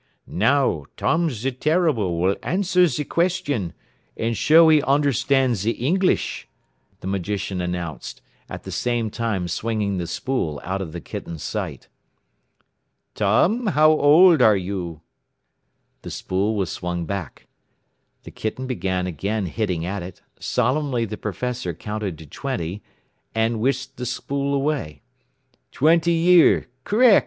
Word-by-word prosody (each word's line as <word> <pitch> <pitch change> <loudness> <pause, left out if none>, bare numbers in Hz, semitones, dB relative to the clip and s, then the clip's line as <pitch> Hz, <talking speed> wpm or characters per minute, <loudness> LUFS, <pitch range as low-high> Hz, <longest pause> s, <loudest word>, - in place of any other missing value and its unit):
"Now 115 - +1
Tom 165 +1 +1
ze 130 0 -3
Terrible 130 - +1
will 95 +3 +2
answer 180 -1 +2
ze 150 0 -2
question, 145 - -1 0.5
and 115 +1 -1
show 160 +9 +6
he 155 -2 +5
onderstan' 135 -2 +2
ze 110 +2 0
Ingleesh," 180 +9 0 0.6
the - - -9
magician 95 0 -2
announced, 90 -6 -5 0.3
at - - -7
the - - -7
same 120 -3 -1
time 110 -6 -2
swinging 105 +1 -1
the 85 - -3
spool 85 - -2
out 95 +3 -3
of 85 -5 -5
the 85 +1 -7
kitten's 80 0 -7
sight. - - -4 1.3
"Tom, 180 - +2
how 155 -4 +5
old 155 +1 +6
you 95 -5 +2
are?" 80 - -24 1.0
The - - -8
spool 100 +4 -1
was 95 -4 -1
swung 90 -1 -3
back, 95 -5 -6 0.8
the - - -10
kitten 110 +4 -4
began 95 -8 -2
again 100 +5 -2
hitting 90 -3 -2
at 95 +2 -3
it, 90 +1 -10 0.2
solemnly 130 -1 0
the 105 0 -5
professor 110 -3 -4
counted 105 -4 -4
to 80 - -11
twenty, 100 - -4 0.5
and 110 0 +1
whisked 135 +2 -1
the 125 - -4
spool 140 +3 -2
away. 135 - -2 0.7
"Twenty 165 +4 +3
year. 170 -2 +5 0.2
Correc'. 225 0 +6
115 Hz, 130 wpm, -22 LUFS, 95-145 Hz, 1.3 s, show